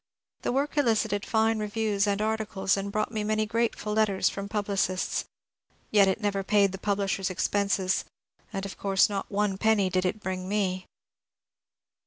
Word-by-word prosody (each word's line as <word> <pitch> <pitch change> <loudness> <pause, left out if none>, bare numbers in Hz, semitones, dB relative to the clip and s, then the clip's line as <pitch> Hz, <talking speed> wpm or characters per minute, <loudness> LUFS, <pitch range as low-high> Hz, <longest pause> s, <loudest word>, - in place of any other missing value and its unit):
The - - -1
work 285 +3 0
elicited 220 -5 +1
fine 220 0 +2
re 210 - -2
views 210 -1 0
and 200 +1 +1
articles 215 -3 0
and 200 0 -3
brought 215 +1 -1
me 215 -2 -2
many 215 0 +1
grateful 225 -1 -1
letters 210 -3 +2
from 200 0 -6
publicists, 200 -3 -1 0.7
yet 205 -2 +6
it 190 - +1
never 200 -2 -1
paid 200 0 +3
the 190 - -7
publi^ers' 195 -2 0
expenses, 190 0 0 0.5
and 195 0 -4
of 195 - -8
course 195 +1 +3
not 200 -1 -3
one 200 -1 0
penny 215 -4 +3
did 185 0 +1
it 185 +4 -1
bring 185 -2 -4
me. 185 -3 -1
205 Hz, 165 wpm, -27 LUFS, 195-215 Hz, 0.7 s, yet